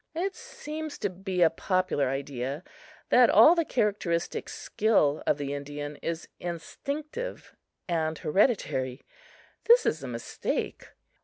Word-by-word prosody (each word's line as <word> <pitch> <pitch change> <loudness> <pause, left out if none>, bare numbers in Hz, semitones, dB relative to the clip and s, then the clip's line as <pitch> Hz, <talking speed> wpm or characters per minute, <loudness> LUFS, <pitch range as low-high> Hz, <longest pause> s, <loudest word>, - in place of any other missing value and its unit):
It 380 +4 -1
seems 315 -10 -7
to - - -2
be 185 -1 0
a 165 - +5
popular 185 -5 0
idea 135 +2 -3 0.5
that 250 -1 +6
all 230 +11 +8
the 340 -1 +2
characteristic 200 - -1
skill 200 -10 +1
of 145 - +3
the 140 -1 -3
Indian 145 +1 -5
is 165 0 -4
instinctive 290 - -5 0.3
and 160 -2 0
hereditary. 150 - +1 0.6
This 475 +1 +7
is 155 - 0
a 135 - -6
mistake. 115 -1 -3
175 Hz, 125 wpm, -28 LUFS, -, 0.6 s, all